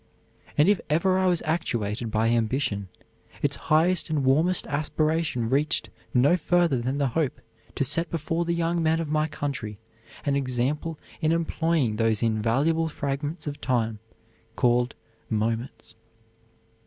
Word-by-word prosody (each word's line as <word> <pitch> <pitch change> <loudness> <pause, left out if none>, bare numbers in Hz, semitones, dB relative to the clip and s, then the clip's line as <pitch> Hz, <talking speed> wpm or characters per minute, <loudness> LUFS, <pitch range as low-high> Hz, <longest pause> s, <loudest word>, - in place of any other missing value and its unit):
And 150 - +5
if 205 -2 +3
ever 185 +5 +2
I 190 - +2
was 175 -2 +2
actuated 120 -9 -1
by 110 +1 +1
ambition, 115 -3 0 0.6
its - - +2
highest 170 +4 +3
and 150 -3 0
warmest 160 +7 +3
aspiration 155 -3 0
reached 145 +6 +1 0.2
no 140 +5 +4
further 170 -6 +2
than 130 +4 -1
the 140 -2 +1
hope 145 +2 -1 0.4
to - - +1
set 145 +6 +1
before 165 +1 -1
the 170 0 -1
young 170 0 0
men 160 0 +2
of 165 -3 -3
my 155 0 +1
country 140 -8 -4 0.5
an 140 -1 +1
example 140 +4 -1 0.2
in 155 0 +2
employing 165 -7 +1
those 115 -1 +1
invaluable 125 +9 +1
fragments 150 +2 -3
of 145 -1 -5
time 115 -4 0 0.6
called 120 -1 +2 0.3
moments." 115 +2 -2
145 Hz, 140 wpm, -26 LUFS, 120-165 Hz, 0.6 s, And